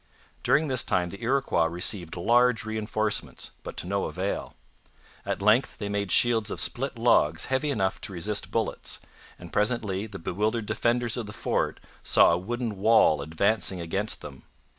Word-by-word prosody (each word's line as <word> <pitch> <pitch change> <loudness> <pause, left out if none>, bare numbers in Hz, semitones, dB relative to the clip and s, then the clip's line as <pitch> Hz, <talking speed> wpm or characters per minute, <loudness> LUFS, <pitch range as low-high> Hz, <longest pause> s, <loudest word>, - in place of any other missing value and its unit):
During 155 +1 +2
this 130 -3 +2
time 90 -1 0
the 100 +5 -10
Iroquois 130 -8 +1
received 85 0 -1
large 120 +4 +3
reinforcements, 110 -1 -2
but - - -9
to - - -3
no 100 +2 -1
avail. 95 +2 -4 0.7
At - - -2
length 110 +5 +3
they 100 -2 -4
made 100 -1 -2
shields 115 -3 +5
of - - -4
split 135 0 -1
logs 115 -10 +3
heavy 145 +3 +1
enough 95 -9 -1
to 100 - -5
resist 100 +4 -2
bullets; - - -2 0.4
and 85 -1 -12
presently 105 -2 0
the 100 -2 -8
bewildered 105 +6 -2
defenders 120 +2 0
of 115 -4 -4
the 105 - -8
fort - - -1 0.2
saw - - +5
a 85 - +2
wooden 115 +2 -4
wall 100 -7 +4
advancing 95 +5 0
against 95 +6 0
them. 70 -3 -10
105 Hz, 160 wpm, -26 LUFS, 95-115 Hz, 0.7 s, shields